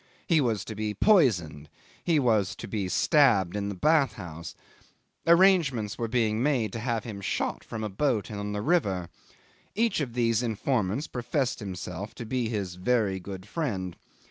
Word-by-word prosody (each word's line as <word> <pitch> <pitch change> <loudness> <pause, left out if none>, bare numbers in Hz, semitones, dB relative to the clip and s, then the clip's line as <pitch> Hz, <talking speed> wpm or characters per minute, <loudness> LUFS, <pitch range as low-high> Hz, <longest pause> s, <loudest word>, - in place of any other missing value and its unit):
He 165 -3 +3
was 110 -6 0
to 110 - -6
be 105 0 -3
poisoned. 90 - +3 0.3
He 170 -3 +2
was 110 -8 +2
to - - -8
be 100 -4 -2
stabbed 105 - +3
in 100 0 -2
the 100 - -4
bath 150 - +3
house. 85 -1 -8 0.7
Arrangements 165 - +4
were 115 - -2
being 110 -2 +1
made 125 -7 +1
to 115 - -4
have 115 -2 -1
him 105 -4 -7
shot - - -2
from 110 -1 -6
a - - -1
boat 110 -1 0
on 105 0 -4
the 105 0 -3
river. 100 - +1 0.7
Each 230 -3 +1
of 125 -5 -3
these 115 -2 +2
informants 115 +1 -1
professed 125 +2 -2
himself 95 -1 -6
to 120 - -7
be 120 0 -1
his 100 -5 -3
very 100 -1 +1
good 95 +1 -8
friend. 100 - -3
110 Hz, 170 wpm, -27 LUFS, 95-130 Hz, 0.7 s, Arrangements